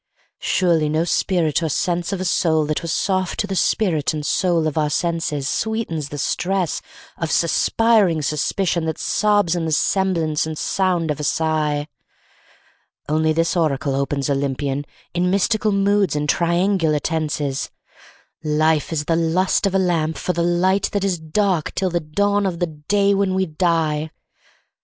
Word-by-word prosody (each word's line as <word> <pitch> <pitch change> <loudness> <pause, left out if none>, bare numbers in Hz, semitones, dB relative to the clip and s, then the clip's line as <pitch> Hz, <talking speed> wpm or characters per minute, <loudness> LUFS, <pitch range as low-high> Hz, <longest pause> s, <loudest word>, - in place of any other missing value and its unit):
Surely 165 -4 +1
no 155 +2 +1
spirit 170 -2 +1
or 160 - -1
sense 175 +4 -1
of 195 - -2
a 185 - -3
soul 160 -3 +2
that 155 0 -2
was 170 - -4
soft 185 0 -1
to 220 - +1
the 195 -1 -4
spirit 165 -5 +1
and 150 -1 -4
soul 170 0 +1
of 155 - -1
our 150 -2 +1
senses 160 -3 -1
Sweetens 220 -11 -2
the 145 - -6
stress 180 +3 -1 0.4
of 165 - -2
suspiring 190 0 +2
suspicion 165 +3 0
that 160 -1 -2
sobs 205 -5 +1
in 170 -2 -2
the 160 - -2
semblance 165 -3 +1
and 160 -1 -5
sound 180 -4 0
of 150 - -4
a - - -4
sigh; 150 -1 0 1.2
Only 155 +1 +1
this 165 +3 +1
oracle 150 -4 0
opens 140 0 -1
Olympian, 140 0 -1 0.3
in 180 +1 +1
mystical 210 +3 +1
moods 200 -2 +2
and 150 0 -1
triangular 170 0 +1
tenses 150 -3 -2 0.7
"Life 155 -1 +1
is 150 -2 -2
the 165 - +1
lust 170 +4 +1
of 195 - -2
a - - +5
lamp 165 -4 0
for 180 - -2
the 170 - -1
light 180 +3 +2
that 200 -1 0
is 185 -4 0
dark 170 +1 -1
till 185 -1 0
the 175 - +1
dawn 200 +6 0
of 175 -3 -3
the 175 - 0
day 200 +6 0
when 195 -1 +1
we 190 0 +1
die." 160 -2 0
165 Hz, 165 wpm, -21 LUFS, 155-190 Hz, 1.2 s, a